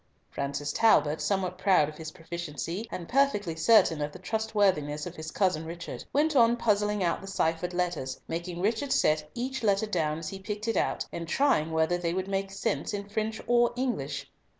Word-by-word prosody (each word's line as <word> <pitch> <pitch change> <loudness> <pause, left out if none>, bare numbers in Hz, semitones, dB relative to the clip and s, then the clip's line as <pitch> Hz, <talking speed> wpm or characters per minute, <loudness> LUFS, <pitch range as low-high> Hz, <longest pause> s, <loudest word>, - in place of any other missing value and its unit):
Francis 140 +1 -3
Talbot, 160 -9 +4
somewhat 185 -2 -1
proud 185 -7 +4
of 155 0 -9
his 160 -1 -5
proficiency, 170 +3 -5
and 170 -2 -5
perfectly 225 -11 +1
certain 160 -2 +4
of 145 0 -2
the - - -10
trustworthiness 190 -8 0
of 175 -1 -7
his 160 -1 -6
cousin 180 -3 +1
Richard, 170 +1 -7
went 300 +2 +2
on 235 -2 +5
puzzling 210 -3 +1
out 170 -1 0
the 195 - -9
ciphered 170 -2 0
letters, 175 -7 -2
making 170 +1 -4
Richard 225 +7 0
set 155 0 +2
each 260 +2 -3
letter 205 -1 +2
down 160 -7 -1
as 165 -1 -5
he 195 - -7
picked 210 +2 -5
it 225 - 0
out, - - 0
and 170 -1 -5
trying 165 - +2
whether 160 +2 +1
they 170 0 -1
would 190 0 -2
make 195 0 -1
sense 195 +1 -2
in 200 0 -5
French 215 +1 -2
or 240 0 +3
English. 250 0 -2
185 Hz, 190 wpm, -28 LUFS, 160-215 Hz, -, on